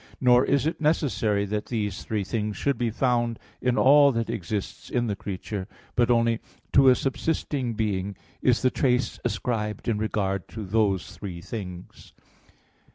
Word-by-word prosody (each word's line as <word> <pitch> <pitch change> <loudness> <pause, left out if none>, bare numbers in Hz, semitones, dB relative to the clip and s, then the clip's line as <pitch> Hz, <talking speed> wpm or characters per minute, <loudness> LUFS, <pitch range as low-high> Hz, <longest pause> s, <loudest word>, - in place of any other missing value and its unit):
Nor 125 -1 +5
is 140 0 +2
it 160 0 -2
necessary 115 - +1
that 105 +1 -3
these 105 -5 -2
three 105 -2 -2
things 105 +1 -2
should 140 -1 +1
be 120 0 0
found 120 0 +1 0.2
in 125 0 +1
all 140 +1 +7
that 115 -1 -1
exists 105 -2 -4
in 120 -1 0
the 105 -3 -1
creature; 95 0 -5 0.3
but 120 0 +3
only 115 -1 +3 0.3
to 135 -1 +7
a 125 - +6
subsisting 135 -3 -1
being 100 -3 -2 0.2
is 125 -1 +2
the 130 - +4
trace 125 -2 +1
ascribed 105 -2 -2
in 110 -3 +1
regard 100 -3 -1
to 110 -2 -7
those 100 -2 0
three 90 -4 -6
things. 90 -1 -8
115 Hz, 160 wpm, -26 LUFS, 100-125 Hz, 0.3 s, all